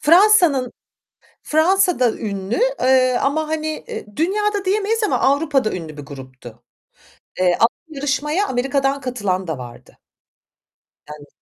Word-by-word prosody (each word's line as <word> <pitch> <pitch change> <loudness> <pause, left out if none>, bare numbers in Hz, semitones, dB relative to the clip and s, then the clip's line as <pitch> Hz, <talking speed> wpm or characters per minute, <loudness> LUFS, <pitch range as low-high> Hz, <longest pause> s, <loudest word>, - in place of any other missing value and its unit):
Fransa'nın 330 - +4 0.7
Fransa'da 315 - +2
ünlü, 200 -1 -4 0.2
eee, 255 -1 +3
ama 310 +3 0
hani, 315 0 -2 0.2
eee, - - -6
dünyada 410 +4 0
diyemeyiz 425 +3 0
ama 425 - +1
Avrupa'da 280 -4 +1
ünlü 160 -4 -7
bir 145 - -8
gruptu. 130 -4 -12 0.8
Eee, 180 -1 +3
alt 230 - +6 0.2
yarışmaya 295 +5 -1
Amerika'dan 270 +1 -1
katılan 205 -8 -2
da 160 -4 -4
vardı. 120 -1 -12 1.1
Yani 150 -1 -11
270 Hz, 115 wpm, -20 LUFS, -, 1.1 s, alt